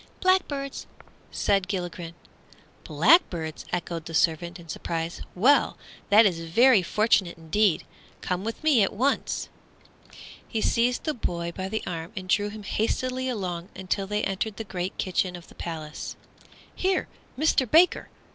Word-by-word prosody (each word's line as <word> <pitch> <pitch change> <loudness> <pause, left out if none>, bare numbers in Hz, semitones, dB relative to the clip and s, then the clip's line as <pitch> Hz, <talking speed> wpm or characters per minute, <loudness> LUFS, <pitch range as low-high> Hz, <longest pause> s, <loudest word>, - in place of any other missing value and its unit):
"Blackbirds," 300 -8 0 0.4
replied 195 -2 +1
Gilligren. 175 -3 -4 0.7
"Blackbirds!" 165 - +3
echoed 170 -2 -3
the 165 - -5
servant, 170 +2 +1
in 170 - -13
surprise, 165 +1 -4
"well, 255 +11 +4 0.3
that 215 +2 +7
is 175 -5 +2
very 215 +8 +5
fortunate 190 -2 +2
indeed. 165 +3 +1 0.4
Come 180 +1 -2
with 225 +6 -5
me 295 -8 +5
at 195 - +2
once!" 260 +7 0 1.0
He 225 - -2
seized 240 +3 +1
the 310 - -1
boy 170 -8 -3
by 190 0 -4
the 220 +2 -3
arm 165 0 -5
and 185 -1 -5
drew 205 +2 +2
him 210 0 -9
hastily 255 +5 -1
along 180 -6 -4
until 190 +1 -2
they 210 +1 -1
entered 195 +2 -2
the 225 - -4
great 185 -2 -4
kitchen 185 -1 -1
of 175 -1 -12
the - - -15
palace. 155 -3 -6 0.6
"Here, 375 0 0 0.3
Mister 280 -3 +2
Baker!" 335 +9 +4
195 Hz, 145 wpm, -26 LUFS, 170-230 Hz, 1.0 s, that